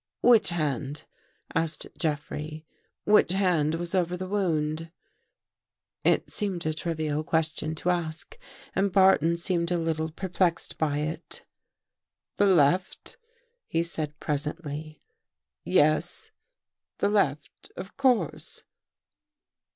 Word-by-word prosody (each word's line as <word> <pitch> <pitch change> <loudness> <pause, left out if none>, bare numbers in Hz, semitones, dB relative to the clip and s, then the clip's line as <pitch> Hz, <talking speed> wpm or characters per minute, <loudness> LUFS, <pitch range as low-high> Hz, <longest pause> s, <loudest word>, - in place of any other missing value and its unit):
"Which 230 -9 +6
hand?" 150 -3 -2 0.5
asked 165 0 -1
Jeffrey. 155 0 -3 0.4
"Which 205 -4 +4
hand 170 -5 +2
was 170 +1 -4
over 180 -1 +1
the 185 +1 -5
wound? 165 -5 -1 0.6
" - - -61
It - - -4
seemed 190 -6 -2
a 155 - +1
trivial 155 -2 -2
question 160 0 -1
to 180 +3 +1
ask 170 - -4 0.4
and 195 0 +2
Barton 180 -3 +5
seemed 170 0 0
a 175 - +1
little 160 -1 -1
perplexed 175 0 -1
by 150 -2 +1
it. 155 +2 -4 0.5
" - - -61
The 205 - +4
left," 180 +1 +2 0.5
he 165 - +1
said 155 -3 -4
presently. 150 +1 -4 0.6
"Yes, - - +2 0.7
the - - +2
left 150 -8 -1
— - - -51
of 190 - -7
course." 245 - 0
165 Hz, 115 wpm, -27 LUFS, 155-180 Hz, 0.7 s, Which